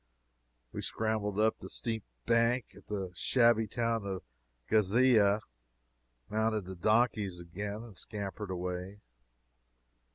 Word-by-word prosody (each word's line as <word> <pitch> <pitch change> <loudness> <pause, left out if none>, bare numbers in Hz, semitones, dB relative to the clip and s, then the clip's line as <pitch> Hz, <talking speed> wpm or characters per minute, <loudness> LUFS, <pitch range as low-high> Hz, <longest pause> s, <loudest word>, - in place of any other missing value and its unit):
We - - -4
scrambled 110 -2 -1
up 110 +1 +3
the - - -8
steep 110 -3 -3 0.2
bank 115 - +2
at - - -16
the 95 -3 -3
shabby 115 - +4
town 115 0 0
of 95 -2 -4 0.4
Ghizeh, 110 0 +4 0.9
mounted 110 -2 0
the 95 +1 -7
donkeys 105 -1 +2
again, 100 +5 -5
and 115 -4 -12
scampered 100 +1 -5
away. 90 +2 -4
105 Hz, 110 wpm, -32 LUFS, 95-115 Hz, 0.9 s, shabby